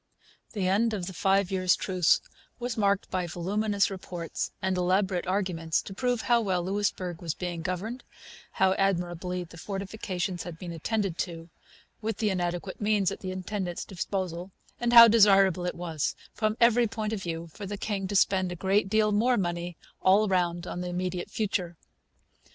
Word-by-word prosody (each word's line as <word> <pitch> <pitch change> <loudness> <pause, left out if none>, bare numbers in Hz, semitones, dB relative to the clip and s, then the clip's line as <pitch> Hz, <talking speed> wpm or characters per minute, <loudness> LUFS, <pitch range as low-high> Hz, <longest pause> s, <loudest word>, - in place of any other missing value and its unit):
The 195 -4 -1
end 215 +4 +2
of 185 -4 -3
the 190 - -6
five 195 +1 +2
years' 185 -1 +3
truce 180 -3 +2 0.4
was 245 -1 -3
marked 200 -2 +1
by 185 -2 -1
voluminous 200 +5 0
reports 175 -3 -5
and 190 -1 0
elaborate 185 0 +1
arguments 180 -4 0
to 195 - -8
prove 245 +2 0
how 240 -1 +3
well 185 -5 0
Louisbourg 185 -3 -2
was 165 -2 -3
being 175 -2 -4
governed, 190 +9 -4 0.5
how 190 0 +3
admirably 180 -1 -1
the 165 -1 -13
fortifications 195 -2 -4
had 175 -2 -7
been 175 0 -7
attended 190 +2 -2
to 165 -3 -4 0.5
(with 220 -1 -2
the 215 -2 +1
inadequate 175 +1 -3
means 205 -3 +2
at - - -6
the 185 - -5
intendant's 185 -1 -4
disposal), 185 -1 -4 0.3
and 240 0 0
how 235 -1 +11
desirable 195 -5 +5
it - - -3
was, 165 -4 -2 0.2
from 215 0 0
every 235 0 +5
point 215 0 -3
of 210 - -3
view, 165 -1 -4
for 200 - -7
the 205 +1 -4
king 195 -2 -2
to 200 - -4
spend 190 -2 +3
a - - -4
great 195 +3 +1
deal 215 0 +3
more 240 +4 +3
money 175 -2 -2 0.2
all 200 +3 +5
round 175 -2 0
in 180 - -5
the 180 - -3
immediate 180 0 -3
future. 185 -5 -2
190 Hz, 175 wpm, -28 LUFS, 175-205 Hz, 0.5 s, how